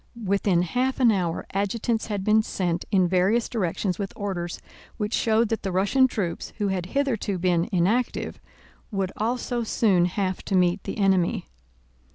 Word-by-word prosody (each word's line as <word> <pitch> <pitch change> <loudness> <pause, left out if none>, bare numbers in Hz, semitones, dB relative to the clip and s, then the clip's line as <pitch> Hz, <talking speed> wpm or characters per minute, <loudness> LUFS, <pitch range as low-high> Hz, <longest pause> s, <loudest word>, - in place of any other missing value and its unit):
Within 195 -2 +2
half 255 +10 -1
an 245 -3 +6
hour 175 -5 -1
adjutants 220 +4 -1
had 205 -3 -2
been 215 +2 +4
sent 175 -5 -2
in 185 -3 +3
various 190 +6 +2
directions 185 -3 -2
with 195 -1 -3
orders 180 -4 -4 0.4
which 210 +1 -2
showed 225 0 +2
that 225 - -1
the 195 - -3
Russian 200 +9 +3
troops, 190 -9 -4
who 205 -2 0
had 185 -2 -2
hitherto 230 -8 0
been 175 0 +1
inactive, 200 +7 0 0.5
would 195 -3 -2
also 240 +2 -1
soon 200 -5 +3
have 185 +1 -2
to 195 - -1
meet 180 +1 +2
the - - -4
enemy. 190 -4 +2
195 Hz, 160 wpm, -25 LUFS, 180-225 Hz, 0.5 s, an